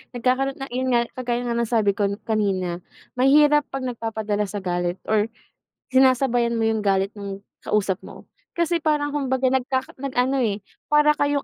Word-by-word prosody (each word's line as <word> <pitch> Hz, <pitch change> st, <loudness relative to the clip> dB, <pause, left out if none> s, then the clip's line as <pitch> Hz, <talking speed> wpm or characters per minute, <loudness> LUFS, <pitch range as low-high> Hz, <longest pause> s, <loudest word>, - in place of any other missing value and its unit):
Nagkakaroon 260 Hz, +3 st, +1 dB
na 270 Hz, 0 st, -6 dB
yun 260 Hz, +1 st, -1 dB
nga 235 Hz, -, +4 dB, 0.2 s
kagaya 245 Hz, -1 st, -1 dB
nga 240 Hz, -, -2 dB
ng 235 Hz, -1 st, 0 dB
sabi 215 Hz, -4 st, +2 dB
ko 200 Hz, 0 st, 0 dB, 0.2 s
kanina, 190 Hz, -5 st, -1 dB, 0.4 s
mahirap 295 Hz, +2 st, +5 dB
'pag 270 Hz, -1 st, -5 dB
nagpapadala 220 Hz, -4 st, -2 dB
sa 200 Hz, 0 st, -6 dB
galit 175 Hz, -1 st, -1 dB, 0.2 s
or 215 Hz, 0 st, +3 dB, 0.7 s
sinasabayan 245 Hz, -3 st, +3 dB
mo 225 Hz, -, +2 dB
yung 220 Hz, -1 st, 0 dB
galit 195 Hz, +1 st, +1 dB
nung 200 Hz, -1 st, -6 dB, 0.2 s
kausap 195 Hz, -3 st, 0 dB
mo. -, -, -12 dB, 0.3 s
Kasi 340 Hz, 0 st, +1 dB
parang 295 Hz, -2 st, +1 dB
kumbaga, 265 Hz, -2 st, +1 dB
nagkaka 260 Hz, 0 st, -1 dB
nag 275 Hz, 0 st, -5 dB
ano, 260 Hz, +1 st, +2 dB
eh, 210 Hz, -2 st, 0 dB, 0.3 s
para 300 Hz, 0 st, +5 dB
kayong 285 Hz, -1 st, 0 dB
240 Hz, 170 wpm, -23 LUFS, 210-270 Hz, 0.7 s, mahirap